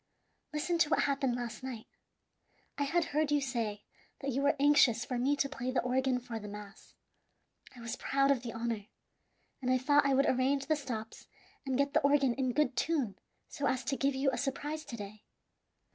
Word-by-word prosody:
Listen 330 Hz, +3 st, -1 dB
to 300 Hz, -, +4 dB
what -, -, +3 dB
happened 275 Hz, -3 st, +1 dB
last 240 Hz, -3 st, -5 dB
night. 255 Hz, -4 st, -6 dB, 0.9 s
I 285 Hz, -, 0 dB
had 330 Hz, +4 st, +1 dB
heard 305 Hz, 0 st, +1 dB
you 295 Hz, -, +4 dB
say 230 Hz, -6 st, -3 dB, 0.4 s
that 275 Hz, -, -2 dB
you 270 Hz, +2 st, 0 dB
were 285 Hz, +1 st, +3 dB
anxious 280 Hz, -5 st, +5 dB
for 250 Hz, -2 st, -2 dB
me 275 Hz, +4 st, +2 dB
to 280 Hz, -, +1 dB
play 255 Hz, -3 st, -4 dB
the 255 Hz, -, +1 dB
organ 255 Hz, 0 st, +1 dB
for 240 Hz, -2 st, -6 dB
the 210 Hz, -, -8 dB
mass. 205 Hz, 0 st, -11 dB, 0.8 s
I 245 Hz, -, -11 dB
was 230 Hz, -1 st, -4 dB
proud 275 Hz, 0 st, +2 dB
of 265 Hz, -4 st, +1 dB
the 240 Hz, -2 st, -5 dB
honor, 225 Hz, -2 st, -3 dB, 0.7 s
and 255 Hz, -, -1 dB
I 255 Hz, -, +4 dB
thought 290 Hz, +3 st, +4 dB
I 275 Hz, -1 st, +3 dB
would 275 Hz, +1 st, +4 dB
arrange 270 Hz, +2 st, +2 dB
the 310 Hz, +2 st, +2 dB
stops 230 Hz, -6 st, -6 dB, 0.4 s
and 260 Hz, -1 st, 0 dB
get 280 Hz, +1 st, +1 dB
the 310 Hz, -, +4 dB
organ 280 Hz, -3 st, +3 dB
in 255 Hz, 0 st, 0 dB
good 275 Hz, -3 st, +1 dB
tune 275 Hz, -9 st, 0 dB, 0.3 s
so 280 Hz, -2 st, -2 dB
as 260 Hz, 0 st, 0 dB
to 275 Hz, -, -1 dB
give 275 Hz, 0 st, +1 dB
you 270 Hz, 0 st, +2 dB
a 250 Hz, -, -3 dB
surprise 295 Hz, +3 st, -3 dB
to 235 Hz, -, -7 dB
day. 205 Hz, 0 st, -9 dB
265 Hz, 205 wpm, -32 LUFS, 240-280 Hz, 0.9 s, anxious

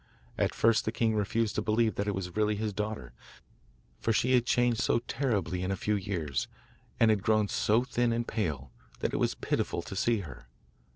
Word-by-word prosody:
At -, -, 0 dB
first 115 Hz, -1 st, +3 dB
the 110 Hz, -, 0 dB
king 115 Hz, -1 st, +1 dB
refused 105 Hz, +1 st, 0 dB
to -, -, -1 dB
believe 110 Hz, +1 st, +2 dB
that 100 Hz, -, -2 dB
it 100 Hz, -, 0 dB
was 90 Hz, -2 st, -5 dB
really 105 Hz, 0 st, +2 dB
his 105 Hz, 0 st, -2 dB
daughter, 105 Hz, +2 st, -4 dB, 0.9 s
for 115 Hz, -, 0 dB
she 125 Hz, +3 st, +2 dB
had 120 Hz, -1 st, +3 dB
changed 120 Hz, -1 st, +2 dB
so -, -, +2 dB
terribly 105 Hz, -, -1 dB
in 90 Hz, -, -2 dB
a 95 Hz, -, 0 dB
few 105 Hz, +3 st, -1 dB
years, 90 Hz, -8 st, -2 dB, 0.5 s
and 115 Hz, -1 st, +6 dB
had 105 Hz, -2 st, +1 dB
grown 110 Hz, 0 st, +2 dB
so 110 Hz, +4 st, +2 dB
thin 120 Hz, -1 st, 0 dB
and 115 Hz, 0 st, -1 dB
pale, 75 Hz, -, -2 dB, 0.3 s
that -, -, -1 dB
it -, -, +1 dB
was -, -, +1 dB
pitiful -, -, -1 dB
to -, -, -7 dB
see 110 Hz, +2 st, +1 dB
her. 75 Hz, -7 st, -10 dB
110 Hz, 205 wpm, -30 LUFS, 100-115 Hz, 0.9 s, and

